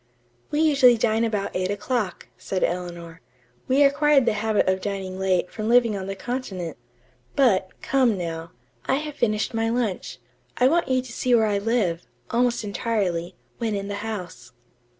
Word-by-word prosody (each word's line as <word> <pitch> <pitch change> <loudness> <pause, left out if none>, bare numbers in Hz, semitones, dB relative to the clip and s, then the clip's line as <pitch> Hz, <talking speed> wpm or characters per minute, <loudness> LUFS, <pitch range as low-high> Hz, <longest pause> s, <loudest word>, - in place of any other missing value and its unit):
"We 295 - 0
usually 275 -6 +5
dine 225 0 +1
about 210 -3 -1
eight 185 0 0
o'clock," 210 0 -2
said 190 - -3
Eleanor. 175 -1 -4 0.5
"We 270 +3 +4
acquired 285 -1 +4
the 230 - +2
habit 215 -1 +1
of 185 0 +1
dining 190 -2 -4
late 185 -2 +1
from 215 0 -3
living 235 -3 +4
on 190 -1 -5
the 195 - -4
continent. 195 -7 -5 0.6
But, 205 -9 +3
come, 255 -6 +2
now. 165 -2 -4 0.4
I 265 - +3
have 300 +1 -4
finished 215 -5 0
my 225 0 0
lunch. 230 -5 -2 0.4
I 250 - +5
want 335 +5 +2
you 255 -1 +1
to 255 - -10
see 250 +1 +2
where 225 -1 +4
I 205 -2 +1
live, 200 -6 0 0.2
almost 240 0 +1
entirely, 200 -5 -2 0.2
when 225 -3 -1
in 200 0 -4
the 200 - -3
house." 180 - -6
215 Hz, 170 wpm, -24 LUFS, 185-245 Hz, 0.6 s, usually